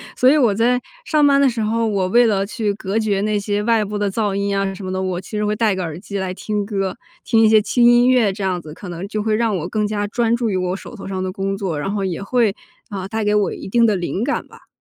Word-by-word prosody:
所 255 Hz, -, +5 dB
以 300 Hz, -, +5 dB
我 240 Hz, -7 st, +3 dB
在 240 Hz, +4 st, +2 dB, 0.3 s
上 305 Hz, -8 st, +3 dB
班 280 Hz, -1 st, +4 dB
的 275 Hz, -, +5 dB
时 230 Hz, -2 st, -3 dB
候， 225 Hz, +1 st, 0 dB
我 195 Hz, -3 st, 0 dB
为 240 Hz, +5 st, +4 dB
了 195 Hz, -3 st, +1 dB
去 210 Hz, 0 st, -2 dB
隔 200 Hz, +2 st, -2 dB
绝 205 Hz, -3 st, 0 dB
那 210 Hz, 0 st, 0 dB
些 205 Hz, 0 st, -1 dB
外 225 Hz, -1 st, +2 dB
部 205 Hz, +1 st, -4 dB
的 205 Hz, -1 st, -1 dB
噪 205 Hz, -2 st, -1 dB
音 200 Hz, 0 st, -1 dB
啊 195 Hz, -1 st, 0 dB
什 190 Hz, -1 st, -8 dB
么 185 Hz, -, -4 dB
的， 185 Hz, 0 st, -2 dB
我 185 Hz, -2 st, -2 dB
其 185 Hz, -, -12 dB
实 210 Hz, -1 st, -1 dB
会 210 Hz, 0 st, 0 dB
带 215 Hz, -2 st, +2 dB
个 185 Hz, -, -3 dB
耳 165 Hz, -3 st, -4 dB
机 200 Hz, 0 st, -5 dB
来 190 Hz, -1 st, -2 dB
听 210 Hz, 0 st, -2 dB
歌， 195 Hz, -2 st, -2 dB, 0.3 s
听 225 Hz, -2 st, +3 dB
一 220 Hz, -, +6 dB
些 220 Hz, -1 st, +6 dB
轻 240 Hz, +3 st, +1 dB
音 240 Hz, +1 st, +6 dB
乐 240 Hz, -6 st, +4 dB
这 195 Hz, +1 st, -6 dB
样 185 Hz, -2 st, -1 dB
子， 155 Hz, -1 st, -10 dB
可 185 Hz, -, -9 dB
能 175 Hz, +3 st, -6 dB
就 210 Hz, 0 st, -3 dB
会 215 Hz, -1 st, +1 dB
让 225 Hz, -3 st, +1 dB
我 170 Hz, -1 st, -4 dB
更 210 Hz, +2 st, -1 dB
加 205 Hz, -1 st, -2 dB
专 230 Hz, +2 st, +1 dB
注 235 Hz, -2 st, -1 dB
于 -, -, -1 dB
我 180 Hz, 0 st, -1 dB
手 215 Hz, -, -10 dB
头 200 Hz, -, -9 dB
上 190 Hz, -1 st, -3 dB
的 185 Hz, -, -2 dB
工 195 Hz, +1 st, -3 dB
作， 185 Hz, -7 st, -3 dB
然 195 Hz, -, -2 dB
后 200 Hz, -1 st, -1 dB
也 180 Hz, 0 st, -3 dB
会， 225 Hz, -1 st, +1 dB, 0.3 s
啊， 190 Hz, -2 st, -5 dB
带 220 Hz, +1 st, -2 dB
给 210 Hz, 0 st, +1 dB
我 205 Hz, -1 st, +2 dB
一 -, -, -8 dB
定 230 Hz, +4 st, +3 dB
的 210 Hz, -, +2 dB
灵 185 Hz, +3 st, -2 dB
感 -, -, -2 dB
吧。 -, -, -18 dB
205 Hz, 315 characters per minute, -20 LUFS, 195-225 Hz, 0.3 s, 一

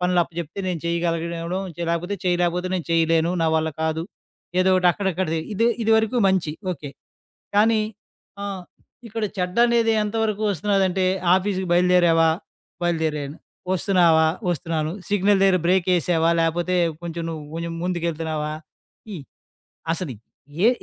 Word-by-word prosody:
పనులు 180 Hz, 0 st, +1 dB
అప్పజెప్తే 170 Hz, 0 st, -7 dB
నేను 175 Hz, -3 st, -2 dB
చేయగలగడం, 170 Hz, +2 st, -2 dB, 0.2 s
లేపోతే 175 Hz, +4 st, -1 dB
చేయలేకపోతే 180 Hz, 0 st, +1 dB
నేను 180 Hz, -3 st, -3 dB
చేయలేను 165 Hz, 0 st, +2 dB
నా -, -, +2 dB
వల్ల 160 Hz, 0 st, 0 dB
కాదు. 160 Hz, 0 st, -1 dB, 0.6 s
ఏదోకటి 185 Hz, -1 st, +3 dB
అక్కడక్కడది. 185 Hz, -4 st, -1 dB
ఇదే 225 Hz, +3 st, +2 dB, 0.2 s
ఇదివరకు 220 Hz, +2 st, +2 dB
మంచి 185 Hz, -5 st, 0 dB, 0.2 s
ఓకే. 150 Hz, -3 st, -8 dB, 0.7 s
కానీ 220 Hz, +1 st, +4 dB, 0.6 s
ఆ! -, -, -3 dB, 0.6 s
ఇక్కడ 225 Hz, 0 st, -3 dB
చెడ్డనేది 230 Hz, +5 st, +2 dB
ఎంతవరకు 215 Hz, 0 st, -1 dB
వస్తున్నదంటే 195 Hz, 0 st, +1 dB, 0.3 s
"ఆఫీస్‌కి 190 Hz, 0 st, 0 dB
బయలుదేరావా?" 175 Hz, -2 st, +4 dB, 0.5 s
బయలుదేరాను. 155 Hz, -4 st, -1 dB, 0.4 s
"ఒస్తున్నావా?" 175 Hz, -4 st, +4 dB, 0.2 s
ఒస్తున్నాను. 165 Hz, -2 st, -2 dB, 0.2 s
"సిగ్నల్ 205 Hz, 0 st, +3 dB
దెగ్గర 190 Hz, -1 st, +4 dB
బ్రేకేసావా?" 175 Hz, -2 st, +2 dB
లేపోతే 170 Hz, +2 st, 0 dB, 0.3 s
కొంచెం 170 Hz, -1 st, -5 dB
నువ్వు, 155 Hz, -2 st, -6 dB
కొంచెం 170 Hz, 0 st, -4 dB
ముందుకెళ్తున్నావా? 165 Hz, -3 st, -2 dB, 0.6 s
ఈ -, -, -4 dB, 0.8 s
అసలు 165 Hz, -5 st, -4 dB, 0.5 s
ఏ -, -, +8 dB
175 Hz, 110 wpm, -23 LUFS, 165-190 Hz, 0.8 s, ఏ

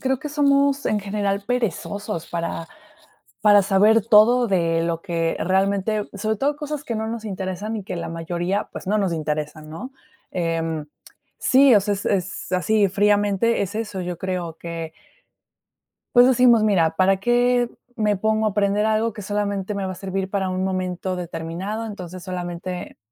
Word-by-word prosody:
creo 265 Hz, -1 st, 0 dB
que 300 Hz, -, -6 dB
somos, 280 Hz, -1 st, +2 dB
en 210 Hz, -, +1 dB
general, 200 Hz, 0 st, -2 dB
perezosos 205 Hz, -7 st, -2 dB
para 170 Hz, -1 st, -3 dB, 0.8 s
para 205 Hz, -1 st, +6 dB
saber 205 Hz, +3 st, +4 dB
todo 230 Hz, +2 st, +5 dB
de 165 Hz, -4 st, +1 dB
lo 165 Hz, +1 st, -2 dB
que 165 Hz, -3 st, -1 dB
realmente, 195 Hz, +3 st, 0 dB
sobre 215 Hz, +2 st, -1 dB
todo 285 Hz, +6 st, 0 dB
cosas 295 Hz, -1 st, -5 dB
que 235 Hz, -7 st, -3 dB
no 220 Hz, 0 st, -2 dB
nos 225 Hz, 0 st, -5 dB
interesan, 195 Hz, +2 st, -4 dB
y 210 Hz, -, -5 dB
que 185 Hz, -, -5 dB
la 170 Hz, -, -4 dB
mayoría, 175 Hz, +4 st, -2 dB
pues, -, -, -8 dB
no 210 Hz, +2 st, +2 dB
nos 195 Hz, -4 st, 0 dB
interesan, 155 Hz, -1 st, -3 dB
¿no? 250 Hz, -, -7 dB, 0.4 s
Em, 165 Hz, -3 st, -2 dB, 0.5 s
sí 265 Hz, -2 st, +5 dB
o 205 Hz, -, +7 dB
sea, 205 Hz, +1 st, -1 dB
es 200 Hz, -, -5 dB
es 190 Hz, -1 st, -2 dB
así, 200 Hz, +3 st, +2 dB
fríamente 205 Hz, +3 st, +2 dB
es 200 Hz, +2 st, -3 dB
eso, 210 Hz, -4 st, -3 dB
yo 180 Hz, -1 st, -4 dB
creo 180 Hz, -3 st, -3 dB
que 165 Hz, -1 st, -6 dB, 1.2 s
pues, 245 Hz, 0 st, +8 dB
decimos, 245 Hz, -3 st, +5 dB
mira, 185 Hz, -7 st, +3 dB
¿para 190 Hz, +2 st, +4 dB
qué 240 Hz, +3 st, +2 dB, 0.3 s
me 210 Hz, -3 st, +1 dB
pongo 220 Hz, +2 st, +1 dB
a -, -, +2 dB
aprender 205 Hz, +1 st, +1 dB
algo 220 Hz, 0 st, +1 dB
que 210 Hz, -, -7 dB
solamente 205 Hz, 0 st, -2 dB
me 195 Hz, -1 st, -2 dB
va 185 Hz, -, -3 dB
a -, -, -7 dB
servir 190 Hz, 0 st, -3 dB
para 190 Hz, -1 st, -1 dB
un 185 Hz, 0 st, -2 dB
momento 185 Hz, -1 st, -2 dB
determinado? 180 Hz, +6 st, -4 dB
Entonces, 185 Hz, -4 st, -8 dB
solamente 180 Hz, 0 st, -5 dB
200 Hz, 170 wpm, -22 LUFS, 180-220 Hz, 1.2 s, pues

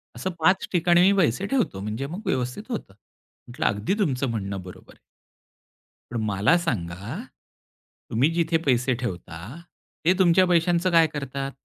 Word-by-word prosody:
असं 190 Hz, -, -3 dB
5 185 Hz, +4 st, +3 dB
ठिकाणी 175 Hz, -1 st, +4 dB
मी 190 Hz, +2 st, +6 dB
पैसे 175 Hz, -, +2 dB
ठेवतो, 245 Hz, -, 0 dB
म्हणजे 110 Hz, +6 st, -4 dB
मग 175 Hz, +8 st, -6 dB
व्यवस्थित 125 Hz, +9 st, -1 dB
होतं. 215 Hz, -, -5 dB, 0.5 s
म्हटलं 120 Hz, -, -4 dB
"अगदी 105 Hz, -, +1 dB
तुमचं 135 Hz, -8 st, 0 dB
म्हणणं 100 Hz, -3 st, -4 dB
बरोबर 90 Hz, 0 st, -13 dB
आहे." -, -, -29 dB, 1.1 s
पण 120 Hz, -, -3 dB
मला 105 Hz, -, +3 dB
सांगा. 105 Hz, -, -3 dB, 0.9 s
तुम्ही 125 Hz, +7 st, +3 dB
जिथे 165 Hz, -1 st, +2 dB
पैसे 125 Hz, -1 st, +2 dB
ठेवता, 90 Hz, -8 st, -5 dB, 0.7 s
ते 180 Hz, -, +5 dB
तुमच्या 185 Hz, 0 st, +5 dB
पैशांचं 175 Hz, +1 st, +2 dB
काय 165 Hz, -1 st, +6 dB
करतात? 140 Hz, -2 st, -5 dB
140 Hz, 145 wpm, -25 LUFS, 110-175 Hz, 1.1 s, मी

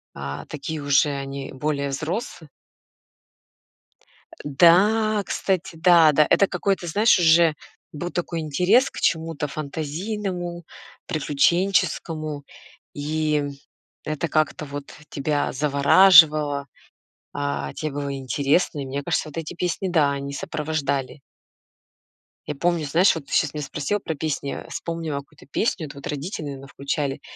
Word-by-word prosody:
А, 70 Hz, 0 st, -6 dB
такие 155 Hz, +1 st, -5 dB
уже, 145 Hz, +1 st, +3 dB
они 140 Hz, -1 st, -5 dB
более 140 Hz, 0 st, -2 dB
взрос 165 Hz, -, -4 dB, 2.0 s
Да, 205 Hz, +8 st, +4 dB
кстати, 185 Hz, -4 st, -2 dB
да, 165 Hz, -1 st, +6 dB
да, 150 Hz, +1 st, +4 dB
это 200 Hz, -, +4 dB
какой-то 185 Hz, 0 st, -1 dB
знаешь, 210 Hz, +6 st, +4 dB
уже 165 Hz, -1 st, +5 dB, 0.4 s
был 175 Hz, +4 st, -5 dB
такой 170 Hz, -1 st, -3 dB
интерес 180 Hz, -, +3 dB
к -, -, -9 dB
чему-то 160 Hz, -2 st, 0 dB
фантазийному, 175 Hz, +5 st, -4 dB, 0.4 s
приключенческому, 155 Hz, -1 st, 0 dB, 0.5 s
и 150 Hz, 0 st, -1 dB, 0.6 s
это 155 Hz, +2 st, -2 dB
как-то 155 Hz, 0 st, 0 dB
вот 145 Hz, 0 st, -8 dB, 0.2 s
тебя 145 Hz, +1 st, -1 dB
завораживало, 145 Hz, 0 st, +5 dB, 0.7 s
а, 140 Hz, -, -3 dB
тебе 155 Hz, -1 st, -4 dB
было 140 Hz, 0 st, -3 dB
интересно, 140 Hz, +4 st, 0 dB
и 135 Hz, -, -5 dB
мне 140 Hz, +2 st, -4 dB
кажется, 155 Hz, -, -1 dB
вот 150 Hz, -, -12 dB
эти 165 Hz, +1 st, -5 dB
песни 180 Hz, +2 st, -2 dB
да, 155 Hz, -5 st, +3 dB
они 140 Hz, 0 st, -5 dB
сопровождали. 140 Hz, -2 st, -3 dB, 1.3 s
Я 150 Hz, -, -3 dB
помню 170 Hz, +1 st, 0 dB
знаешь, 170 Hz, +7 st, +4 dB
вот 160 Hz, -4 st, -6 dB
ты -, -, -8 dB
щас 150 Hz, -, +2 dB
меня 150 Hz, -1 st, -4 dB
спросила 150 Hz, +8 st, -2 dB
про 160 Hz, -5 st, -4 dB
песни, 140 Hz, -2 st, -3 dB
вспомнила 165 Hz, -4 st, -4 dB
какую-то 140 Hz, -, -16 dB
песню, 165 Hz, +1 st, -1 dB
это 140 Hz, -, -12 dB
вот 140 Hz, -, -7 dB
родители, 150 Hz, +3 st, -4 dB
наверное, 135 Hz, -1 st, -7 dB
включали: 140 Hz, 0 st, -3 dB
155 Hz, 125 wpm, -23 LUFS, 140-170 Hz, 2.0 s, да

